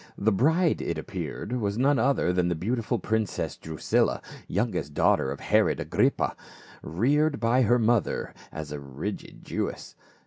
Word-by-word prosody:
The 110 +2 +2
bride, 160 - +2
it - - -2
appeared, - - -5
was 100 -1 -1
none 135 +3 +3
other 135 -9 +2
than 90 -1 +2
the 85 - 0
beau 95 +10 -2
tiful 115 -4 0
princess 110 -3 -1
Drusilla, 80 -1 0 0.3
youngest 100 -8 -2
daughter - - +3
of 70 - -5
Herod - - +2
Agrippa, - - +1 0.5
reared 145 - +1
by 120 +3 +3
her 120 0 +4
mother 115 -4 +1 0.2
as 80 -2 -6
a 75 - -4
rigid 70 +9 -6
Jewess. - - -4
110 Hz, 150 wpm, -27 LUFS, 85-125 Hz, 0.5 s, her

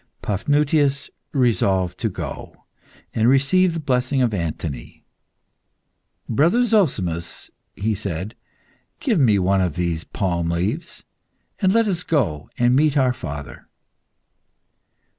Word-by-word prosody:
Paphnutius 145 +6 +1 0.2
resolved 95 - +1
to 115 - 0
go 90 - -8 0.5
and 115 +1 +3
receive 165 +7 +3
the - - -2
blessing 130 -2 0
of 115 -3 +1
Anthony. 80 -5 -5 1.2
"Brother 170 - +3
Zozimus," 95 - 0 0.2
he 110 +2 -1
said, 100 0 -4 0.7
"give 255 - +1
me 115 -7 +4
one 95 +1 +2
of 90 -5 -1
these 85 -2 -1
palm 85 -4 -2
leaves, 85 +4 -3 0.6
and 190 - +3
let 230 +1 +3
us 180 -4 -1
go 105 - -1
and 120 +1 +3
meet 150 +1 +3
our 130 -2 +3
father." 75 - -8
115 Hz, 115 wpm, -22 LUFS, 90-145 Hz, 1.2 s, me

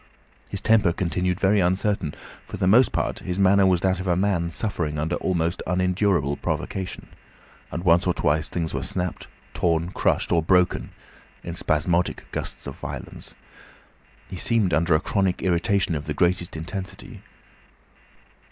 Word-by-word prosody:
His 100 - -3
temper 110 -5 +4
continued 90 +1 -1
very 100 +1 +3
uncertain; 95 -2 0 0.3
for - - -6
the - - 0
most 115 +8 +5
part - - -1
his 90 0 -4
manner 100 0 +5
was 90 -2 +2
that 95 -1 +1
of 95 - -4
a 90 - +3
man 90 -3 +1
suffering 80 -5 -3
under 80 +3 -1
almost 85 -2 -1
unendurable 90 -5 +1
provocation, 95 -2 -4 0.7
and 85 - -4
once 85 0 +4
or 90 - +3
twice 80 0 +1
things 85 -2 -3
were - - -2
snapped, 90 -2 -3 0.3
torn, 85 0 0
crushed, - - 0
or 85 - +4
broken 90 +2 +2 0.5
in 85 - -5
spasmodic 85 +2 0
gusts - - -5
of - - -7
violence. - - -8 0.9
He 95 - -7
seemed 110 -3 +1
under 80 +2 +3
a - - +3
chronic 95 +1 0
irritation 95 +1 +1
of 75 -1 -3
the 75 - -3
greatest 90 0 0
intensity. 90 +4 -7
90 Hz, 150 wpm, -24 LUFS, 85-95 Hz, 0.9 s, most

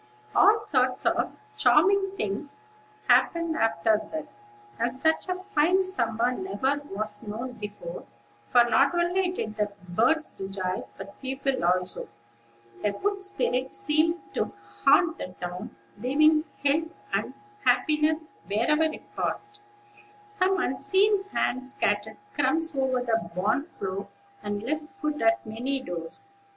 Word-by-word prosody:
All 430 +1 +5
sorts 255 -9 +1
of - - +2 0.2
charming 390 0 +4
things 245 - -3 0.4
happened 335 -1 +3
after 220 - +2
that, 315 -2 -4 0.5
and 240 +2 -1
such 320 +5 +2
a 365 - +1
fine 375 0 +3
summer 235 - +1
never 285 -3 -1
was 210 +1 -3
known 225 +4 -5
before; 225 - -7 0.4
for 245 -1 +6
not 270 +7 +3
only 355 +2 +2
did 215 -12 -4
the 210 -1 0 0.2
birds 245 - +2
rejoice, 190 -1 -3
but 200 - -10
people 270 -3 -1
also. 180 +1 +1 0.8
A 205 - +1
good 400 - -1
spirit 265 -10 -1
seemed 330 -2 +2
to - - -1 0.4
haunt 355 -5 +5
the 185 - -6
town, 180 +5 -6 0.2
leaving 305 +6 +4 0.2
help 320 +4 +2 0.2
and - - -1 0.3
happiness 300 +5 +2
wherever 270 +10 +3
it - - -10
passed. 415 0 -3 0.6
Some 385 -2 +1
unseen 385 +8 +2
hand 260 -10 -1
scattered 220 -5 -1 0.2
crumbs 325 0 +1
over 265 -2 +1
the 225 -7 0
barn 205 +10 +1
floor, 195 - -5 0.3
and 205 0 -3
left 300 +4 -3
food 295 +3 -3
at 340 +1 +3
many 245 +5 -2
doors. 175 - -7
270 Hz, 130 wpm, -27 LUFS, 220-335 Hz, 0.8 s, for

